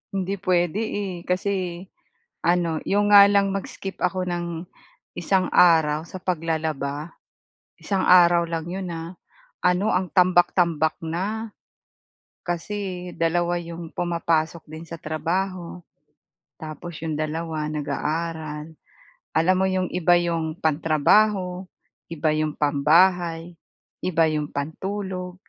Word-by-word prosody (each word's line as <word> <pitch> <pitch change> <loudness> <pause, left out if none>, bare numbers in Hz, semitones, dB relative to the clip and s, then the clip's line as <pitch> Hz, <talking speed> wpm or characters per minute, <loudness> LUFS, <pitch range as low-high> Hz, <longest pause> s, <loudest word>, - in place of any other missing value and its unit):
Hindi 195 +1 -1
puwede, 180 0 +1
eh. 205 -4 -3
Kasi 180 -1 -1 0.6
ano, 170 -2 +2
'yong 205 +1 +2
nga 200 -1 +10
lang 200 -1 +3
mag-skip 195 0 -6
ako 185 +1 0
ng 175 -1 -2 0.7
isang 185 +2 +1
araw 160 -3 +5
sa 185 - -8
paglalaba, 160 -3 -2 0.6
isang 195 -2 -1
araw 175 -1 +6
lang 165 -1 -3
'yon, 190 0 -4
ah. 165 +2 -7 0.5
Ano, 180 +4 +3
ang 180 0 0
tambak-tambak 175 -3 +3
na. 205 +6 -3 0.9
Kasi 180 0 -4
2 175 +1 +1
'yong 170 -1 -8
pumapasok 170 -2 -1
din 160 +1 -8
sa 165 0 -8
trabaho 175 +4 -3 0.8
tapos 155 +1 -7
'yong 160 -1 -3
2, 155 0 -3
nag-aaral. 155 +1 -3 0.7
Alam 185 +3 +3
mo, 190 - +2
'yong 185 -1 0
iba 175 0 +4
'yong 165 -1 -2
pantrabaho, 180 +5 +2 0.4
iba 160 -1 0
'yong 155 -1 -1
pambahay, 165 +3 +2 0.5
iba 165 -2 +3
'yong 150 -1 -2
pantulog, 180 +4 -4
175 Hz, 110 wpm, -24 LUFS, 160-185 Hz, 0.9 s, nga